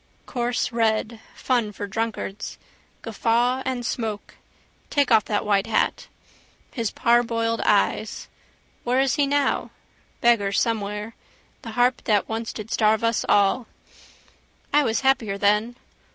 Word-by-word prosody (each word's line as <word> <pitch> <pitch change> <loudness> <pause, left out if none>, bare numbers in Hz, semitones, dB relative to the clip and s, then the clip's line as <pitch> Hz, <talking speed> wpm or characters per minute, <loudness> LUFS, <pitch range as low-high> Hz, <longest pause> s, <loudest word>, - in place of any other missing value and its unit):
Coarse 245 0 -1
red: 225 -1 0 0.2
fun 240 -5 0
for 205 - -6
drunkards: 215 -1 -4 0.5
guffaw 235 +3 +1
and 250 -2 -2
smoke. 220 -4 -4 0.6
Take 285 -3 +1
off 215 - +5
that 205 -1 -1
white 200 0 +1
hat. 225 - 0 0.6
His 230 -5 -2
parboiled 230 0 +1
eyes. - - +1 0.6
Where 250 +2 +1
is 270 -2 +2
he 290 -2 +2
now? 285 0 0 0.5
Beggar 215 -4 +3
somewhere. 210 -1 -1 0.5
The 225 - -8
harp 245 +2 +2
that 210 -2 +2
once 225 +1 -3
did 215 0 -8
starve 220 0 +2
us 230 -1 +1
all. 205 +4 +3 1.1
I 295 - +6
was 225 -2 0
happier 240 -7 +1
then. 210 +4 +1
230 Hz, 125 wpm, -24 LUFS, 210-245 Hz, 1.1 s, I